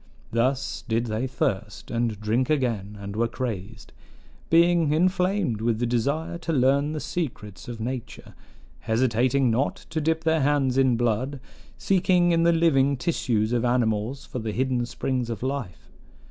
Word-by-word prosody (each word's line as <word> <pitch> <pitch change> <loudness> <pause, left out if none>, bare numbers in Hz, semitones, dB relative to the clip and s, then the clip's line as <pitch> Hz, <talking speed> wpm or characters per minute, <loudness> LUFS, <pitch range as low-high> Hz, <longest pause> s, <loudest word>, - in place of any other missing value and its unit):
Thus 130 +4 0
did 115 0 0
they 115 +3 -2
thirst, 110 -7 -3
and 115 -3 -1
drink 115 +6 0
again, 115 -9 -1
and 100 0 -7
were 115 +2 +1
crazed; 110 -4 -6 0.6
being 170 -2 +4
inflamed 180 - +1
with 115 -1 +1
the 120 - 0
desire 140 +8 -1
to 170 - -3
learn 140 +1 +2
the 155 - -3
secrets 115 - -5
of 120 -2 -6
nature, 125 +1 -6 0.5
hesitating 125 +2 +2
not 130 +6 0 0.2
to 160 - -1
dip 160 +1 0
their 160 -1 +2
hands 135 -2 +2
in 130 -3 +3
blood, 120 +4 -1 0.4
seeking 180 -2 +2
in 165 -1 +3
the 170 0 +4
living 140 -5 +3
tissues 120 -7 0
of 120 -1 +1
animals 120 +1 0
for 125 - -5
the 110 -2 -4
hidden 125 -1 0
springs 125 -1 -2
of 115 +1 -4
life. 130 -10 -4
130 Hz, 155 wpm, -25 LUFS, 115-150 Hz, 0.6 s, being